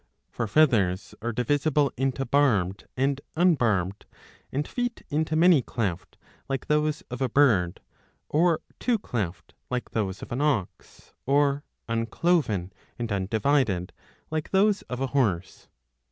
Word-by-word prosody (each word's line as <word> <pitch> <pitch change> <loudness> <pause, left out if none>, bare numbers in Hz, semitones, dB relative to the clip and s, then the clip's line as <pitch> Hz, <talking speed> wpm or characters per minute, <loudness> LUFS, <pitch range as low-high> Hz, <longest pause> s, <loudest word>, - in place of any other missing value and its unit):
For 115 - -2
feathers 105 -8 +2
are 120 +2 -2
divisible 145 +4 +1
into 135 +1 -1
Barbed 105 -11 +1
and 135 +1 +1
Un 175 +2 +5
barbed, 100 - 0 0.4
and 145 +3 -2
feet 245 -1 -3
into 155 +1 0
Many 165 -2 +6
cleft, 95 -8 -4 0.3
like 135 -2 -2
those 150 0 +1
of 125 +1 -5
a 130 - +1
bird, 110 -11 +3 0.5
or 165 +1 +2 0.2
Two 245 -2 +2
cleft, 95 - -4 0.2
like 125 -1 -3
those 100 -4 -2
of - - -10
an 125 +4 -1
ox, 140 -11 -2
or 140 +1 +2 0.2
Uncloven 115 - 0 0.2
and 115 -2 -4
Undivided, 100 -1 +1 0.4
like 155 -1 -2
those 200 +1 +3
of 125 +1 -4
a 135 - +1
horse. 95 -10 -1
130 Hz, 135 wpm, -26 LUFS, 105-150 Hz, 0.5 s, Many